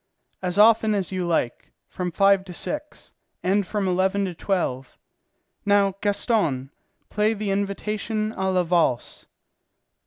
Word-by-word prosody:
"As 180 Hz, 0 st, -2 dB
often 220 Hz, 0 st, +5 dB
as 195 Hz, -3 st, -2 dB
you 185 Hz, -2 st, -2 dB
like, 160 Hz, -8 st, -2 dB
from 180 Hz, -1 st, -4 dB
five 195 Hz, +2 st, +4 dB
to 180 Hz, -, -9 dB
six, 300 Hz, -, -5 dB, 0.3 s
and 195 Hz, +1 st, +1 dB
from 205 Hz, -3 st, -1 dB
eleven 190 Hz, +2 st, +1 dB
to 185 Hz, -, -4 dB
twelve. 160 Hz, -8 st, -2 dB, 0.7 s
Now, 200 Hz, -1 st, +3 dB
Gaston, 195 Hz, -, 0 dB, 0.4 s
play 215 Hz, +2 st, +1 dB
the 205 Hz, -1 st, -2 dB
Invitation 210 Hz, +2 st, -2 dB
à 190 Hz, 0 st, -1 dB
la 185 Hz, -1 st, +2 dB
Valse." 165 Hz, -8 st, 0 dB
195 Hz, 130 wpm, -24 LUFS, 180-210 Hz, 0.7 s, often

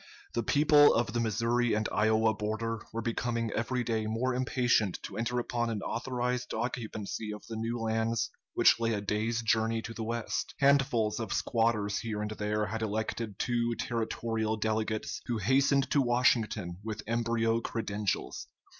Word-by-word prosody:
The 120 Hz, -, +1 dB
people 145 Hz, +3 st, +5 dB
of 115 Hz, -2 st, 0 dB
the 120 Hz, -, 0 dB
Missouri 115 Hz, +1 st, +1 dB
and 110 Hz, +1 st, 0 dB
Iowa 110 Hz, +1 st, +3 dB
border 110 Hz, +2 st, -3 dB
were 115 Hz, +1 st, -3 dB
becoming 115 Hz, -1 st, -1 dB
every 120 Hz, +3 st, -1 dB
day 110 Hz, -2 st, -1 dB
more 120 Hz, +4 st, 0 dB
impatient 125 Hz, -5 st, +1 dB
to -, -, -7 dB
enter 120 Hz, +2 st, -1 dB
upon 120 Hz, -1 st, -1 dB
an 105 Hz, -3 st, -3 dB
authorized 125 Hz, 0 st, -2 dB
occupancy 110 Hz, -3 st, -3 dB
of 105 Hz, -, -8 dB
the 115 Hz, -, -6 dB
new 115 Hz, +2 st, -2 dB
lands 115 Hz, 0 st, 0 dB, 0.2 s
which -, -, +5 dB
lay 115 Hz, 0 st, +1 dB
a -, -, -1 dB
day's 110 Hz, +3 st, -1 dB
journey 110 Hz, 0 st, +2 dB
to 115 Hz, -, -6 dB
the 115 Hz, -, -5 dB
west. 115 Hz, 0 st, -3 dB
Handfuls 135 Hz, -6 st, +3 dB
of 110 Hz, -3 st, -4 dB
squatters 110 Hz, -3 st, +1 dB
here 110 Hz, -3 st, -3 dB
and 105 Hz, 0 st, -3 dB
there 105 Hz, 0 st, -1 dB
had 110 Hz, +1 st, -4 dB
elected 110 Hz, 0 st, -2 dB
two 120 Hz, 0 st, 0 dB
territorial 115 Hz, -1 st, -2 dB
delegates, 110 Hz, 0 st, -1 dB
who 120 Hz, -, 0 dB
hastened 135 Hz, +6 st, +2 dB
to 145 Hz, -, +4 dB
Washington 120 Hz, -8 st, +1 dB
with 110 Hz, -1 st, -5 dB
embryo 115 Hz, 0 st, +1 dB
credentials. 105 Hz, -, -3 dB
115 Hz, 160 wpm, -30 LUFS, 110-120 Hz, 0.2 s, people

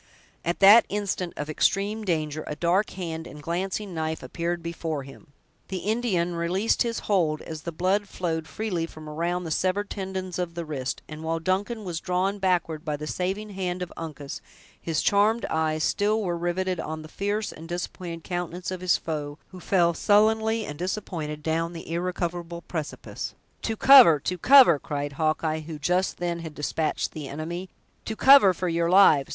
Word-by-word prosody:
At 170 Hz, +3 st, -2 dB
that 205 Hz, +4 st, +8 dB
instant 200 Hz, -3 st, -2 dB
of 150 Hz, -, -3 dB
extreme 200 Hz, +7 st, 0 dB
danger, 155 Hz, -5 st, -1 dB
a 150 Hz, -, -4 dB
dark 175 Hz, +6 st, +1 dB
hand 165 Hz, -3 st, -5 dB
and 150 Hz, -, -10 dB
glancing 185 Hz, +5 st, -3 dB
knife 160 Hz, -1 st, -3 dB
appeared 170 Hz, 0 st, -3 dB
before 165 Hz, -3 st, -3 dB
him; 135 Hz, +3 st, -14 dB, 0.4 s
the 190 Hz, -, -4 dB
Indian 205 Hz, -6 st, 0 dB
released 175 Hz, +6 st, 0 dB
his 235 Hz, -1 st, 0 dB
hold, 165 Hz, -7 st, +1 dB
as 160 Hz, -1 st, -7 dB
the 170 Hz, -, -5 dB
blood 190 Hz, +5 st, 0 dB
flowed 160 Hz, -3 st, -3 dB
freely 185 Hz, -7 st, -2 dB
from 155 Hz, -1 st, -11 dB
around 170 Hz, +4 st, -2 dB
the 165 Hz, -, -5 dB
severed 190 Hz, +5 st, 0 dB
tendons 190 Hz, -2 st, -4 dB
of 170 Hz, -2 st, -3 dB
the 170 Hz, -1 st, -4 dB
wrist; 135 Hz, -4 st, -4 dB
and 155 Hz, 0 st, -8 dB
while 165 Hz, +1 st, -1 dB
Duncan 200 Hz, +7 st, -1 dB
was 175 Hz, -4 st, -4 dB
drawn 190 Hz, +3 st, -1 dB
backward 175 Hz, -5 st, 0 dB
by 150 Hz, -3 st, -2 dB
the 150 Hz, -, -6 dB
saving 190 Hz, +6 st, -3 dB
hand 185 Hz, -2 st, -3 dB
of 180 Hz, -, -8 dB
Uncas, 150 Hz, -4 st, -7 dB, 0.4 s
his 165 Hz, -2 st, -1 dB
charmed 210 Hz, +3 st, +3 dB
eyes 155 Hz, -1 st, 0 dB
still 210 Hz, +2 st, +1 dB
were 175 Hz, -3 st, -1 dB
riveted 175 Hz, +1 st, -1 dB
on 155 Hz, 0 st, -5 dB
the -, -, -9 dB
fierce 205 Hz, +5 st, -2 dB
and 165 Hz, +2 st, -11 dB
disappointed 175 Hz, -1 st, -5 dB
countenance 180 Hz, 0 st, -4 dB
of 185 Hz, -1 st, -5 dB
his 185 Hz, -1 st, +3 dB
foe, 150 Hz, -2 st, -4 dB
who 185 Hz, -, -11 dB
fell 175 Hz, -2 st, +2 dB
sullenly 220 Hz, +3 st, +3 dB
and 145 Hz, -3 st, -7 dB
disappointed 170 Hz, -5 st, -4 dB
down 165 Hz, +1 st, -1 dB
the 165 Hz, -, -8 dB
irrecoverable 170 Hz, -1 st, -3 dB
precipice. 155 Hz, -4 st, -5 dB, 0.3 s
"To 225 Hz, -1 st, -2 dB
cover! 250 Hz, -, +8 dB
to 180 Hz, +3 st, -3 dB
cover!" 255 Hz, -, +7 dB
cried 145 Hz, 0 st, -4 dB
Hawkeye, 155 Hz, +1 st, 0 dB
who 155 Hz, 0 st, -7 dB
just 180 Hz, +5 st, 0 dB
then 175 Hz, -1 st, -2 dB
had 160 Hz, -2 st, -8 dB
despatched 155 Hz, +2 st, -1 dB
the 150 Hz, -3 st, -7 dB
enemy; 170 Hz, +6 st, -5 dB, 0.4 s
"to 220 Hz, -, -3 dB
cover, 265 Hz, -5 st, +8 dB
for 180 Hz, 0 st, -3 dB
your 170 Hz, 0 st, +1 dB
lives! 175 Hz, -7 st, +6 dB
175 Hz, 180 wpm, -26 LUFS, 160-190 Hz, 0.4 s, that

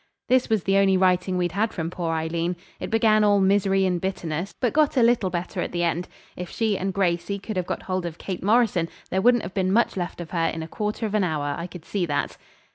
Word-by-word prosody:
This 255 Hz, 0 st, +3 dB
was 220 Hz, -5 st, +1 dB
the 195 Hz, 0 st, +2 dB
only 195 Hz, -1 st, +4 dB
writing 185 Hz, 0 st, +2 dB
we'd 175 Hz, -1 st, 0 dB
had 215 Hz, +5 st, 0 dB
from 165 Hz, -1 st, -4 dB
poor 170 Hz, -2 st, -2 dB
Aileen. 165 Hz, +2 st, -1 dB, 0.2 s
It -, -, -5 dB
began 220 Hz, -1 st, +4 dB
all 205 Hz, -1 st, +4 dB
misery 195 Hz, 0 st, +3 dB
and 180 Hz, -2 st, 0 dB
bitterness, 180 Hz, -1 st, -3 dB
but 245 Hz, -3 st, 0 dB
got 300 Hz, -2 st, +2 dB
a 245 Hz, -, +5 dB
little 230 Hz, -5 st, +3 dB
better 175 Hz, +1 st, -3 dB
at -, -, -3 dB
the 175 Hz, 0 st, 0 dB
end. 170 Hz, +1 st, 0 dB, 0.3 s
If 180 Hz, -1 st, -6 dB
she 220 Hz, -3 st, 0 dB
and 190 Hz, +1 st, -2 dB
Gracey 180 Hz, 0 st, 0 dB
could 205 Hz, +2 st, -6 dB
have 180 Hz, -1 st, -2 dB
got -, -, -3 dB
hold 185 Hz, -2 st, -2 dB
of 165 Hz, -1 st, -8 dB
Kate 185 Hz, -3 st, -5 dB
Morrison 205 Hz, -6 st, +2 dB, 0.2 s
there 190 Hz, -, +1 dB
wouldn't 240 Hz, +2 st, +4 dB
have 175 Hz, -, -6 dB
been 190 Hz, -1 st, 0 dB
much 235 Hz, +4 st, +2 dB
left 175 Hz, -2 st, -4 dB
of 170 Hz, -2 st, -7 dB
her 165 Hz, -2 st, +1 dB
in 160 Hz, 0 st, -3 dB
a -, -, -7 dB
quarter 210 Hz, +5 st, -3 dB
of 210 Hz, -, -3 dB
an 210 Hz, -2 st, +2 dB
hour, 150 Hz, -4 st, -1 dB
I 170 Hz, +3 st, -5 dB
could 180 Hz, -2 st, -11 dB
see 190 Hz, -4 st, -1 dB
that. 145 Hz, -2 st, -2 dB
185 Hz, 250 wpm, -24 LUFS, 175-205 Hz, 0.3 s, a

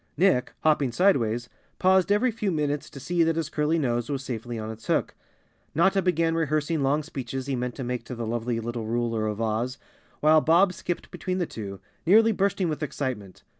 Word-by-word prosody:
Nick, 175 Hz, -7 st, +3 dB
hopping 150 Hz, -5 st, +2 dB
sidewise, 120 Hz, -, +2 dB, 0.3 s
paused 190 Hz, +1 st, +3 dB
every 235 Hz, +5 st, +3 dB
few 210 Hz, -3 st, -2 dB
minutes 150 Hz, -2 st, -1 dB
to 140 Hz, -, -10 dB
see 170 Hz, +6 st, 0 dB
that 165 Hz, -1 st, +3 dB
his 160 Hz, -2 st, -2 dB
curly 155 Hz, +2 st, +1 dB
nose 120 Hz, -5 st, 0 dB
was 135 Hz, -2 st, -2 dB
safely 120 Hz, -1 st, -5 dB
on 110 Hz, 0 st, -4 dB
its 110 Hz, 0 st, -11 dB
hook. -, -, +1 dB, 0.6 s
Notta 190 Hz, +5 st, +4 dB
began 165 Hz, -3 st, +1 dB
rehearsing 155 Hz, -1 st, 0 dB
long 140 Hz, +3 st, +2 dB
speeches 135 Hz, -3 st, -5 dB
he 135 Hz, -1 st, -1 dB
meant 125 Hz, -1 st, -3 dB
to 135 Hz, -, -5 dB
make 125 Hz, -1 st, -3 dB
to 125 Hz, -, -6 dB
the 115 Hz, -1 st, -4 dB
lovely 115 Hz, +1 st, -2 dB
little 115 Hz, -1 st, -4 dB
ruler 115 Hz, -1 st, 0 dB
of 105 Hz, 0 st, -3 dB
Oz, 115 Hz, +4 st, -1 dB, 0.4 s
while 155 Hz, +1 st, +5 dB
Bob 175 Hz, +5 st, +4 dB
skipped 175 Hz, -1 st, -5 dB
between 185 Hz, -1 st, -3 dB
the 180 Hz, -, 0 dB
two, 100 Hz, -8 st, -7 dB, 0.3 s
nearly 220 Hz, +5 st, +6 dB
bursting 195 Hz, -2 st, +1 dB
with 155 Hz, -2 st, -3 dB
excitement. 130 Hz, -9 st, -4 dB
145 Hz, 195 wpm, -26 LUFS, 120-170 Hz, 0.6 s, nearly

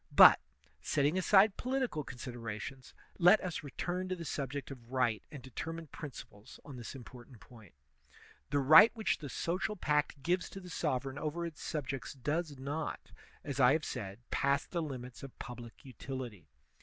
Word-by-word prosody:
But, -, -, +10 dB, 0.4 s
setting 145 Hz, -, +1 dB
aside 190 Hz, +2 st, +5 dB
political 255 Hz, -, -1 dB
considerations, 125 Hz, 0 st, -7 dB, 0.2 s
let 180 Hz, +5 st, +7 dB
us 180 Hz, -3 st, -3 dB
return 175 Hz, +6 st, -3 dB
to 185 Hz, -, 0 dB
the 170 Hz, -2 st, -7 dB
subject 140 Hz, 0 st, -4 dB
of 120 Hz, -3 st, -11 dB
right 125 Hz, -5 st, +1 dB
and 145 Hz, -5 st, -9 dB
determine 165 Hz, +6 st, -5 dB
principles 125 Hz, -9 st, -10 dB
on 140 Hz, -, -9 dB
this 120 Hz, +2 st, -7 dB
important 125 Hz, -1 st, -12 dB
point. 110 Hz, -, -16 dB, 0.7 s
The 145 Hz, -, +1 dB
right 155 Hz, -, +9 dB
which 220 Hz, -1 st, 0 dB
the 145 Hz, -, -6 dB
social 185 Hz, -, -1 dB
pact 150 Hz, -5 st, 0 dB
gives 180 Hz, +4 st, +1 dB
to 195 Hz, -, -8 dB
the 180 Hz, -2 st, -10 dB
sovereign 135 Hz, -3 st, -1 dB
over 160 Hz, +3 st, -2 dB
its 165 Hz, -3 st, -7 dB
subjects 140 Hz, -4 st, -4 dB
does 150 Hz, +3 st, -2 dB
not, 145 Hz, +4 st, -4 dB, 0.3 s
as 140 Hz, -1 st, -4 dB
I 125 Hz, 0 st, +7 dB
have 155 Hz, -1 st, 0 dB
said, 100 Hz, -1 st, -5 dB
pass 140 Hz, +1 st, +2 dB
the 170 Hz, -, -3 dB
limits 130 Hz, -5 st, -6 dB
of 135 Hz, -2 st, -10 dB
public 120 Hz, 0 st, -9 dB
utility. 125 Hz, -, -7 dB
140 Hz, 160 wpm, -33 LUFS, 125-165 Hz, 0.7 s, But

